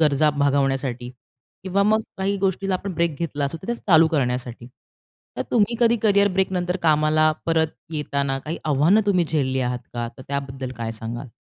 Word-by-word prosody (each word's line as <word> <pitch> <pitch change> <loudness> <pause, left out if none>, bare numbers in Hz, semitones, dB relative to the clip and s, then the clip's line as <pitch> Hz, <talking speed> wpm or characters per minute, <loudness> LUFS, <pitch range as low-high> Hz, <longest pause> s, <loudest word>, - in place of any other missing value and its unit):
गरजा 150 0 +3
भागवण्यासाठी 135 -3 0 0.5
किंवा 190 +1 +1
मग 215 +2 +3 0.2
काही 200 +1 0
गोष्टीला 195 0 0
आपण 190 +1 -4
ब्रेक 170 -2 0
घेतला 150 -4 -2
असू, 140 +4 -3
तर - - -9
त्याच 235 0 -3
चालू 160 -2 +7
करण्यासाठी. 125 -5 -2 0.7
तर - - -1
तुम्ही 235 0 +2
कधी 235 0 +4
कॅरियर 200 -1 +4
ब्रेकनंतर 180 -1 0
कामाला 155 0 +3 0.2
परत 160 -1 +2 0.2
येताना 140 -3 -1
काही 155 +5 -5
आव्हानं 155 +8 +4
तुम्ही 185 -4 +3
झेलली 135 -4 0
आहात 125 -1 -1 0.2
का? 120 -1 -2
तर 130 - -10
त्याबद्दल 135 -2 -4
काय 115 -1 -3
सांगाल? 115 +4 -6
155 Hz, 170 wpm, -23 LUFS, 135-190 Hz, 0.7 s, चालू